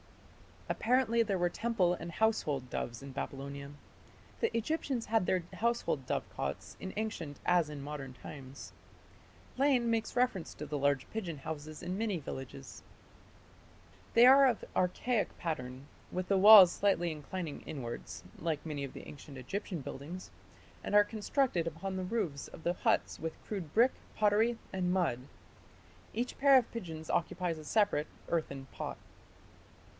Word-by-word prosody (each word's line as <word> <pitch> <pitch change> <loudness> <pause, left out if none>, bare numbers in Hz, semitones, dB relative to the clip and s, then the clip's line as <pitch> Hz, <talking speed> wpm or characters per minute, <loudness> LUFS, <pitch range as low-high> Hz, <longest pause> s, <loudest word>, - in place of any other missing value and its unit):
Apparently 235 -1 +2
there 205 -4 +1
were 175 0 +2
temple 195 -3 +1
and 170 -1 -6
household 150 - 0
doves 120 +2 -4
in 140 - -8
Babylonia. 140 +1 -5 0.7
The 460 - 0
Egyptians 260 -1 -1
had 220 -4 +2
their 185 -2 +2
household 230 - 0
dovecots 95 +9 -3
in 190 - -5
ancient 170 -10 -4
as 175 -3 +3
in 150 -2 -6
modern 140 -3 -6
times. 135 +1 -10 0.9
Lane 260 -4 +3
makes 225 -1 -1
reference 245 -8 0
to 150 - -6
the 150 0 -3
large 140 -1 +1
pigeon 175 -9 -4
houses 155 +1 -6
in 185 +3 -3
many 215 -4 0
villages. 130 - -8 1.3
They 235 +1 +9
are 270 +2 +9
of 240 -4 0
archaic 210 +5 0
pattern, 130 -5 -4 0.3
"with 185 0 -3
the 195 - +4
walls 195 -2 +11
slightly 190 -4 +1
inclining 155 +1 -5
inwards 115 - -6 0.2
(like 160 -2 -2
many 150 -3 -3
of 135 - -6
the - - -9
ancient 145 -1 -10
Egyptian 170 - -4
buildings)", 150 +8 -7 0.5
and - - -1
are 205 - +9
"constructed 215 - 0
upon 190 +4 -4
the 185 - -2
roofs 180 -9 -2
of 160 - -12
the 175 - +1
huts - - +1
with 160 0 -4
crude 185 -8 -5
brick, 240 +4 +5 0.2
pottery, 215 +3 +3 0.2
and 180 -1 0
mud.... 175 -10 +1 0.9
Each 245 +2 -2
pair 275 -1 +7
of 245 - +1
pigeons 165 -8 -6
occupies 175 -1 0
a 155 - -10
separate 205 -5 +2 0.2
(earthen) 140 -5 -2
pot." - - -5
175 Hz, 150 wpm, -33 LUFS, 145-220 Hz, 1.3 s, walls